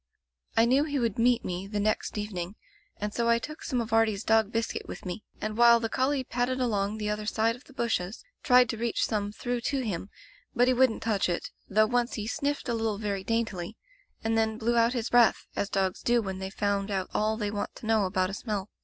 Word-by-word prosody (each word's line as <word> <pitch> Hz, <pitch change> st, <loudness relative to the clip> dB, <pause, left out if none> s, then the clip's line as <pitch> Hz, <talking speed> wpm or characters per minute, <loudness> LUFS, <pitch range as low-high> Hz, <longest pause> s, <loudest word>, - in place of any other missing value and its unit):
" 60 Hz, 0 st, -28 dB
I 225 Hz, -, +6 dB
knew 260 Hz, +4 st, +4 dB
he 290 Hz, -2 st, -2 dB
would 230 Hz, -4 st, -1 dB
meet 240 Hz, +1 st, +3 dB
me 180 Hz, +2 st, -4 dB
the 205 Hz, 0 st, -3 dB
next 215 Hz, +1 st, 0 dB
even 210 Hz, -1 st, -4 dB
ing, 175 Hz, +4 st, -5 dB, 0.4 s
and 210 Hz, 0 st, -3 dB
so 235 Hz, -1 st, +1 dB
I 235 Hz, -, +5 dB
took 305 Hz, +7 st, -7 dB
some 255 Hz, -, -1 dB
of 225 Hz, -1 st, -3 dB
Artie's 225 Hz, -2 st, +3 dB
dog 220 Hz, -1 st, +3 dB
biscuit 230 Hz, 0 st, -2 dB
with -, -, -8 dB
me, 180 Hz, +3 st, -5 dB, 0.2 s
and 215 Hz, 0 st, -3 dB
while 235 Hz, 0 st, +7 dB
the 225 Hz, -1 st, -2 dB
collie 265 Hz, +2 st, +1 dB
padded 250 Hz, +1 st, -1 dB
along 210 Hz, -4 st, 0 dB
the 210 Hz, -1 st, -3 dB
other 210 Hz, 0 st, -3 dB
side 225 Hz, +1 st, +1 dB
of 250 Hz, -, -17 dB
the 275 Hz, -, -17 dB
bushes, 225 Hz, -, -2 dB, 0.2 s
tried 250 Hz, -2 st, +6 dB
to 230 Hz, -, -2 dB
reach 235 Hz, +1 st, 0 dB
some 205 Hz, -2 st, -1 dB
through 245 Hz, +2 st, -3 dB
to 275 Hz, +2 st, -1 dB
him, 200 Hz, -4 st, -3 dB, 0.5 s
but 245 Hz, 0 st, +4 dB
he 255 Hz, -, +4 dB
wouldn't 255 Hz, -2 st, +2 dB
touch 210 Hz, -5 st, +1 dB
it, 175 Hz, -, -2 dB, 0.2 s
though 215 Hz, +2 st, +4 dB
once 245 Hz, +2 st, 0 dB
he 210 Hz, -, -4 dB
sniffed 285 Hz, +6 st, -2 dB
a 240 Hz, -, 0 dB
little 225 Hz, -2 st, -1 dB
very 200 Hz, -2 st, -3 dB
daintily, 220 Hz, -3 st, -2 dB, 0.5 s
and 225 Hz, 0 st, +1 dB
then 220 Hz, -1 st, +1 dB
blew 235 Hz, +2 st, 0 dB
out 235 Hz, +1 st, +4 dB
his 235 Hz, -3 st, -2 dB
breath, 240 Hz, -2 st, +4 dB
as 200 Hz, -, -1 dB
dogs 190 Hz, -2 st, 0 dB
do 240 Hz, 0 st, +3 dB
when 190 Hz, -4 st, -4 dB
they've 190 Hz, 0 st, -5 dB
found 200 Hz, 0 st, -1 dB
out 190 Hz, -2 st, -1 dB
all 215 Hz, +1 st, +1 dB
they 210 Hz, -2 st, -2 dB
want 205 Hz, -1 st, -4 dB
to -, -, -10 dB
know 220 Hz, -2 st, +3 dB
about 185 Hz, 0 st, 0 dB
a -, -, -8 dB
smell. 210 Hz, -2 st, -4 dB
220 Hz, 240 wpm, -28 LUFS, 205-235 Hz, 0.5 s, while